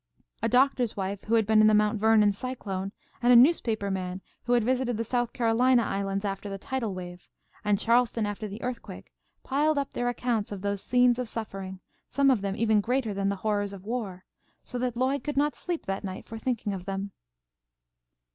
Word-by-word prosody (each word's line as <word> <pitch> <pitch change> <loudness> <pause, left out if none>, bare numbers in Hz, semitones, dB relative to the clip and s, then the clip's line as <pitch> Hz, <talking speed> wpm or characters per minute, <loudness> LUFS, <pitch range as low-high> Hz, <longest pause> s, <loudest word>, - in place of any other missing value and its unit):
A - - +1
doctor's 250 -3 +2
wife 195 0 -3
who 225 - +2
had 225 -2 +3
been 215 0 +5
in 215 - +6
the 215 - +5
Mt. 210 0 +2
Vernon 215 -1 +5
cyclone, 195 -5 -4 0.3
and 245 +1 +4
a - - +8
newspaper 235 -7 +4
man 185 -1 -3 0.3
who 245 - +1
had 240 -2 +4
visited 250 -1 0
the 230 - -1
South 240 +1 -1
Carolina 240 +1 +3
islands 195 0 -2
after 200 +1 -3
the 195 - -4
tidal 225 -1 -3
wave, 180 -1 -8 0.4
and 205 -1 +2
Charleston 235 0 +2
after 205 +1 -4
the 205 +3 -8
earthquake, 250 -1 -6 0.3
piled 295 +3 +1
up 280 -1 -1
their 245 0 -1
accounts 240 -4 -1
of 200 -2 -5
those 200 -1 -1
scenes 245 +1 +3
of 250 -3 -3
suffering, 195 -4 -6 0.3
some 275 0 +3
of 240 -6 +1
them 195 -1 -2
even 215 -1 +3
greater 240 -1 0
than 195 0 0
the 200 - 0
horrors 205 -2 0
of 195 -1 -10
war, 210 -6 -4 0.4
so 250 - -5
that 245 -1 -2
Lloyd 265 +3 0
could 295 -2 -4
not 295 +1 +2
sleep 350 -2 -4
that 195 0 -3
night, 190 -1 -6
for 225 -1 -8
thinking 225 -4 -2
of 185 -2 -6
them. 195 0 -4
220 Hz, 205 wpm, -27 LUFS, 200-245 Hz, 0.4 s, a